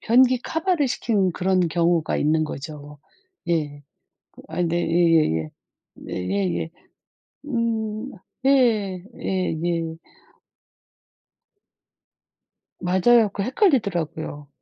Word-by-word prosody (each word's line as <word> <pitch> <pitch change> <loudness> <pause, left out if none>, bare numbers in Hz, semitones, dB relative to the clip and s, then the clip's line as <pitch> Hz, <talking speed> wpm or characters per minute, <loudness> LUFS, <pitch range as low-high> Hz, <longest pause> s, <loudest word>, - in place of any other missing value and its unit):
변기 250 +2 +4
커버를 320 -1 0
시킨 205 -6 0
그런 185 +2 +1
경우가 170 -1 +1
있는 155 +1 +2
거죠. 150 0 -8 0.5
예. 150 -4 -1 0.7
아이 180 - -1
네. 170 +1 0
예예예. 165 - +2 0.5
네 - - -9
예예. 90 -4 -1 0.8
음. 230 -1 -2 0.3
예. 220 -9 +3 0.2
예예. 170 -3 -1 2.8
맞아요. 205 +5 +4
그 200 - -2
헷갈리더라고요. 190 - 0
180 Hz, 170 characters per minute, -23 LUFS, 155-230 Hz, 2.8 s, 변기